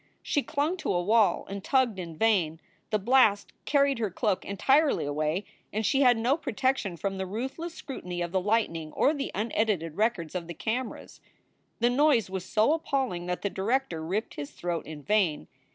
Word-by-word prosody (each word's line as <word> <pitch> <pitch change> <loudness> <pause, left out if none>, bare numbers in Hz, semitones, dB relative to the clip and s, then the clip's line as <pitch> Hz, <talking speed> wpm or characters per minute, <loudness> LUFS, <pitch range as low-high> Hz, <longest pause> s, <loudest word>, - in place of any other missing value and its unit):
She 290 - +1
clung 300 +7 -1
to 315 - -2
a 175 -1 +1
wall 215 +2 +3
and 195 0 -6
tugged 250 -6 +2
in 165 -3 -7
vain. 175 -8 +2 0.3
The 215 - +2
blast 210 -2 +3
carried 280 -3 +2
her 220 -3 0
cloak 200 +1 -1
en 200 - -6
tirely 285 - +3
away 155 +6 -1 0.3
and 215 +1 -1
she 270 +5 +3
had 250 -3 +5
no 245 +6 +2
protection 260 - -1
from 195 +2 -3
the 190 - -2
ruthless 265 - -5
scrutiny 180 -10 -6
of 170 - -4
the 190 0 +1
lightning 180 -7 0
or 290 - +3
the 280 -2 -3
unedited 205 -6 -1
records 205 -8 0
of 175 -2 -4
the 170 - -7
cameras. 240 +6 -4 0.6
The 240 +1 +4
noise 255 -7 +3
was 190 -2 -3
so 220 +10 +3
appalling 265 - -1
that 180 0 -3
the 200 - +1
director 200 -5 -1
ripped 195 +7 -2
his 145 -1 -6
throat 170 -1 -4
in 155 -2 -8
vain. 185 - +1
210 Hz, 185 wpm, -28 LUFS, 175-260 Hz, 0.6 s, had